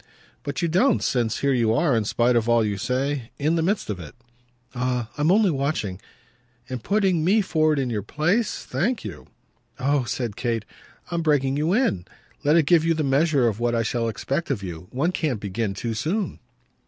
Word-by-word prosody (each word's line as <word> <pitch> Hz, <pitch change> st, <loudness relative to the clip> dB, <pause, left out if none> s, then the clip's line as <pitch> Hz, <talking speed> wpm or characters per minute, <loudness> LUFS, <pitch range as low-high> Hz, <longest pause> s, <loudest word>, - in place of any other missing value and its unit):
"But 145 Hz, +5 st, -4 dB
you -, -, +3 dB
don't 185 Hz, +12 st, +3 dB
since 120 Hz, -4 st, 0 dB
here 140 Hz, -1 st, +2 dB
you 115 Hz, -3 st, +2 dB
are, 145 Hz, -2 st, +2 dB
in 110 Hz, -2 st, +1 dB
spite 120 Hz, +3 st, +2 dB
of 115 Hz, 0 st, +1 dB
all 120 Hz, -2 st, +4 dB
you 105 Hz, -1 st, -1 dB
say, 130 Hz, +4 st, -2 dB
in 150 Hz, +3 st, +1 dB
the 165 Hz, -, +1 dB
midst 195 Hz, +6 st, 0 dB
of 105 Hz, -4 st, -4 dB
it." 80 Hz, -, -10 dB, 0.6 s
"Ah 125 Hz, -2 st, -2 dB
I'm 150 Hz, +3 st, +2 dB
only 205 Hz, -1 st, +4 dB
watching 135 Hz, -10 st, -2 dB, 0.3 s
!" 125 Hz, +1 st, -33 dB
"And 130 Hz, -3 st, -5 dB
putting 195 Hz, -5 st, +2 dB
me 200 Hz, +6 st, +4 dB
forward 155 Hz, -5 st, +2 dB
in 130 Hz, -3 st, -1 dB
your 105 Hz, -2 st, -1 dB
place? 175 Hz, -, 0 dB
Thank 245 Hz, -2 st, -1 dB
you!" 85 Hz, -11 st, -8 dB, 0.5 s
"Oh," 140 Hz, 0 st, +1 dB
said 120 Hz, -3 st, -3 dB
Kate, 115 Hz, -3 st, -2 dB, 0.5 s
"I'm 170 Hz, -1 st, 0 dB
breaking 140 Hz, -4 st, +2 dB
you 155 Hz, +4 st, 0 dB
in. 210 Hz, -, +1 dB, 0.4 s
Let 150 Hz, +2 st, +4 dB
it 165 Hz, -3 st, +4 dB
give 170 Hz, 0 st, +4 dB
you 165 Hz, 0 st, +2 dB
the 155 Hz, -, 0 dB
measure 140 Hz, -1 st, +3 dB
of 110 Hz, -1 st, -1 dB
what 120 Hz, 0 st, +1 dB
I 115 Hz, -, +1 dB
shall 115 Hz, +1 st, -1 dB
expect 135 Hz, +8 st, -3 dB
of 120 Hz, -8 st, -2 dB
you. 90 Hz, -1 st, -7 dB
One 150 Hz, +8 st, 0 dB
can't 150 Hz, -, -1 dB
begin 100 Hz, 0 st, -3 dB
too 115 Hz, +3 st, -3 dB
soon." 170 Hz, -, -2 dB
135 Hz, 205 wpm, -24 LUFS, 115-160 Hz, 0.6 s, all